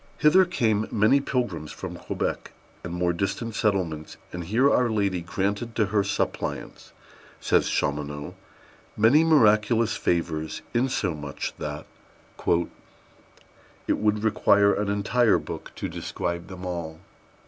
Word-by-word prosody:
Hither 185 +5 +5
came 110 - 0
many 110 +6 +4
pilgrims 100 - -2
from - - -7
Quebec - - -4 0.3
and 85 - -5
more 90 0 0
distant 105 +6 -2
settlements, 90 -8 -1 0.2
and 90 0 -4
here 115 +9 +3
Our 125 -3 +3
Lady 100 -5 0
granted 100 +6 -2
to 110 - +2
her 100 -2 +3
suppliants, 100 0 -3 0.5
says - - +2
Chaumonot, 75 0 -2 0.6
many 115 +9 +5
miraculous 115 -6 +4
favors, 80 -2 -1
insomuch 90 - -2
that - - -5 0.6
"it 85 0 -5
would 105 0 +1
require 100 -2 +4
an 105 -1 -1
entire 105 +3 +3
book - - -7
to - - -4
describe 85 0 -4
them 95 -1 -8
all." 85 -3 -5
100 Hz, 120 wpm, -25 LUFS, 85-115 Hz, 0.6 s, Hither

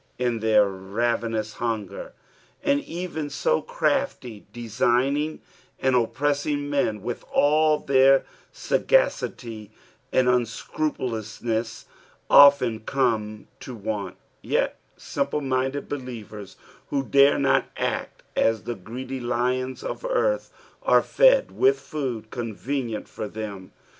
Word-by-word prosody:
in 120 -2 0
their 105 -2 +4
raven 115 +4 -2
ous 110 0 -3
hunger, 120 - -3 0.5
and 285 0 +2
even 165 -3 -4
so 485 - +1
crafty, 275 - -2
designing, 125 +6 0 0.4
and 130 -1 +2
oppressing 145 +4 0
men, 125 -8 0
with 120 - -4
all 155 +1 +4
their 135 -1 +4 0.3
saffacity 115 - 0 0.4
and 130 -1 +3
unscrupulouxneBB, 115 -2 -2 0.5
often 140 -6 +7
come 110 -4 -1
to 125 - -8
want; 105 -3 -4 0.3
yet - - 0 0.2
simple 140 +1 -2
minded 135 0 -1
believers, 115 -7 -7 0.3
who 140 -1 0
dare 140 +1 +5
not 135 -1 +3
act - - -3
as 110 -3 +2
the 120 - -3
greedy 125 +6 -7
lions 125 +2 -1
of - - -5
earth, - - 0 0.3
are - - +4
fed - - +4
with 410 +1 +3
food 130 -8 -5
convenient 120 0 -4
for 110 - -6
them. 100 -3 -7
125 Hz, 110 wpm, -25 LUFS, 110-145 Hz, 0.5 s, often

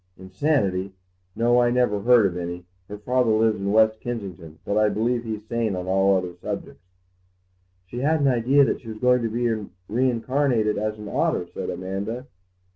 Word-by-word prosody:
"Insanity? 95 -2 -1 0.4
No, 120 +2 +3
I 120 - +3
never 120 -4 +1
heard 120 +1 +5
of 90 -3 0
any. 90 0 -5 0.2
Her 105 - -7
father 125 +3 +1
lives 110 -1 +2
in 100 0 -1
West 110 0 +4
Kensington, 95 -9 -6
but 100 - -1
I 105 0 +4
believe 120 +3 0
he's 110 -2 -5
sane 115 -4 -1
on 90 0 -4
all 95 +1 +3
other 90 -1 -4
subjects." - - -6 1.0
"She 120 +6 -7
had 155 +4 +2
an 140 - +2
idea 130 +3 +4
that - - -2
she 115 - -15
was 110 -1 -6
going 125 +2 +3
to 115 - -1
be 120 +2 -1 0.4
reincarnated 125 -1 +1
as 110 0 -2
an 105 0 -8
otter," - - 0
said - - -4
Amanda. 100 +7 -4
110 Hz, 180 wpm, -24 LUFS, 100-120 Hz, 1.0 s, heard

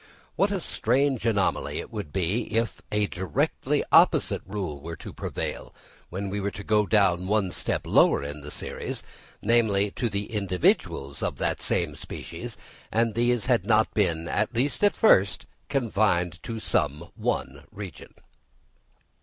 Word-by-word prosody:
What 200 +1 +2
a 200 - 0
strange 130 -4 +1
anomaly 100 -4 +1
it - - -7
would 75 - -5
be 95 +7 0
if 115 -4 -1
a 105 0 +2
directly 90 -5 -1
opposite - - +5
rule 95 -8 -4
were 85 +2 -6
to - - -9
prevail - - -5 0.3
when 95 +2 -4
we 100 - -2
go 105 +1 +1
down 95 -4 +3
one 100 -2 +1
step - - -1
lower - - +4
in 75 +1 -6
the 75 - -8
series, - - -5 0.4
namely 105 -4 +3
to 120 +2 -2
the 100 +2 -4
individuals 90 -8 0
of - - -2
the - - 0
same 85 -4 0
species, 75 - -7 0.3
and 115 0 +2
these 120 0 +1
had 120 -7 +3
not 110 +1 +3
been, 85 -5 +1
at 120 - 0
least 140 - 0
at 205 - +4
first, 100 - +4 0.2
confined 100 -9 +1
to 115 -1 -5
some 75 -4 -1
one 70 +2 -2
region! 95 -8 -9
100 Hz, 145 wpm, -26 LUFS, 85-115 Hz, 0.4 s, opposite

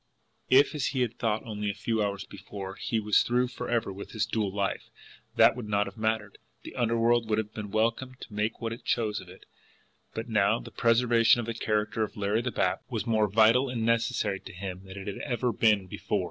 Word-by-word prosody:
If, 135 +3 +5
as 150 -3 -1
he 130 - -1
had 120 -1 -2
thought 110 -2 0
only 105 -2 -3
a 100 - -3
few 115 -2 -1
hours 100 -1 -2
before, 95 -1 -8
he 115 +3 -2
was 105 -2 +3
through 125 +1 +1
forever 115 -4 -2
with 100 - -9
his 110 -1 0
dual 105 -3 -1
life, 100 0 -2 0.5
that 115 +1 +6
would 120 -4 -6
not 105 0 +2
have - - -9
mattered, 110 -2 -2 0.2
the - - -9
underworld 115 -1 +2
would 105 - +2
have 110 -1 -3
been 105 -2 -6
welcome 115 +4 0
to 110 - -10
make 105 +2 -1
what 115 -1 -3
it 115 - -10
chose 110 -3 0
of 90 - -14
it 95 - -14 0.7
but 115 +1 -4
now 110 0 +2
the - - -10
preservation 115 0 +4
of 120 - -2
the 115 - -3
character 110 0 -1
of 110 - -2
Larry 105 +2 +1
the 125 - -2
Bat - - 0
was 115 -3 -3
more 110 -2 +2
vital 115 +6 +4
and 115 -3 -2
necessary 115 -4 +1
to - - -11
him 95 0 -6
than 95 +1 -10
it 95 - -7
had 100 - -5
ever 125 -2 -1
been 105 -3 +3
before. 90 - -2
110 Hz, 220 wpm, -28 LUFS, 105-115 Hz, 0.7 s, that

